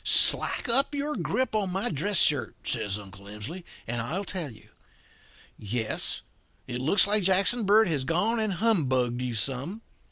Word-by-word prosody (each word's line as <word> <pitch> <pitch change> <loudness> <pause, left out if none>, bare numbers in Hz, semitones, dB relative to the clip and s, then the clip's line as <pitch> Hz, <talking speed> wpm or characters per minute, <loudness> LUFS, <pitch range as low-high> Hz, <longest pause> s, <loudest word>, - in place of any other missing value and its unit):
"'Slack - - +6
up 270 +5 +2
your 290 +1 -3
grip 260 -2 -2
in 210 -3 0
my 195 +5 -2
dress 180 +6 -2
shirt,' 145 -5 +1
says 100 0 -2
Uncle 100 -1 -13
Emsley, 105 - -8 0.2
'and 120 0 -3
I'll 160 +12 -3
tell 175 -7 -4
you. 110 - -18 0.9
Yes, 110 +1 -3 0.4
it 125 +1 -5
looks 160 +10 +5
like 210 +1 +3
Jackson 195 +5 +2
Bird 215 +1 +5
has 150 -6 -1
gone 190 - 0
and 215 -3 -1
humbugged 130 - 0
you 125 -2 -3
some. 135 - -1
170 Hz, 160 wpm, -26 LUFS, -, 0.9 s, Slack